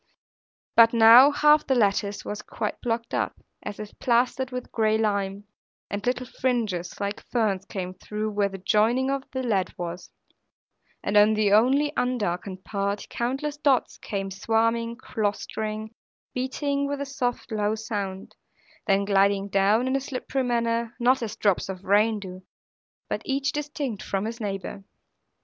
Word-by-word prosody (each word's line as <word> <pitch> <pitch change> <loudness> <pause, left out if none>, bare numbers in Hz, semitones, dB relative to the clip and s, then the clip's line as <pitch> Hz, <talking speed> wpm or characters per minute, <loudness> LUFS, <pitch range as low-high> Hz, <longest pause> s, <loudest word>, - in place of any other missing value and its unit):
But 230 0 +7
now, 230 +4 +9
half 300 +1 +4
the 265 - +3
lattice 205 -2 +1
was 210 - -4
quite 210 - -4
blocked 230 -1 -2
up, - - -1 0.2
as 205 - -7
if 210 -1 -7
plastered 250 +2 +1
with 250 -1 -6
gray 220 -1 +2
lime; 200 -2 -1 0.5
and 205 0 -3
little 250 0 0
fringes, 230 -9 -2
like 200 +1 -3
ferns, 205 -5 -1
came 185 -2 -5
through, 215 +3 -4
where 205 -1 +1
the 195 - -7
joining 225 +7 +2
of 275 0 -3
the 260 0 -3
lead 200 -6 0
was; 175 0 -6 0.9
and 205 - -1
in 210 +1 +6
the 210 -2 +2
only 270 +7 +4
undarkened 195 -6 -2
part, 200 0 -2
countless 270 +5 -2
dots 280 -4 +1
came 195 -1 -4
swarming, 230 +3 0
clustering, 215 -1 -3 0.4
beating 280 +2 -1
with 285 0 -3
a 280 - -2
soft, 250 -4 -3
low 210 0 0
sound, 205 -4 -5 0.5
then 200 0 +3
gliding 200 0 +2
down 200 +5 +3
in 260 - +1
a 275 - 0
slippery 270 0 -3
manner, 235 -1 0
not 255 +2 +3
as 220 -2 -4
drops 200 -2 +1
of 190 0 -6
rain 210 +3 +3
do, 185 -2 -9 0.7
but - - -3
each 275 0 0
distinct 290 -6 -4
from 195 +1 -2
his 230 +1 -5
neighbour. 195 -1 -4
220 Hz, 155 wpm, -25 LUFS, 200-250 Hz, 0.9 s, now